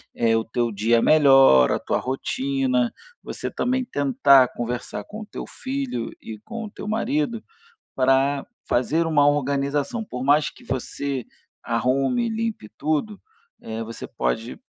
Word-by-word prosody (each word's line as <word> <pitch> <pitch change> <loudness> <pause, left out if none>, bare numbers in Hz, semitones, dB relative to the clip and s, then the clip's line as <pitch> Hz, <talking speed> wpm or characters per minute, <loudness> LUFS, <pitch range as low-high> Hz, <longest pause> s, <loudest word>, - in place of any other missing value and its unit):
eh, 115 -1 +2
o 110 - -1
teu 120 0 -1
dia 115 +3 +2
melhor, 135 - +6
a - - -1
tua - - -1
rotina, 130 -1 -1 0.3
você - - -6
também 255 +1 0
tentar 140 - +4
conversar 120 -3 -4
com 215 +1 -9
o - - -7
teu - - -7
filho 265 - -4
e 110 -2 -8
com 230 - -7
o 205 - -9
teu - - -8
marido 235 +1 -1 0.5
para 135 +2 +2 0.2
fazer 155 +7 +1
uma 145 -3 +4
organização. 145 - 0
Por 125 -7 -6
mais 145 +2 +3
que - - -18
você 135 0 -3 0.4
arrume 135 - +1
e - - -1
limpe 220 - -3
tudo, 155 +7 -1 0.4
eh, 110 0 -5
você 115 +1 -8
pode, 110 - -3
135 Hz, 145 wpm, -23 LUFS, 120-200 Hz, 0.5 s, melhor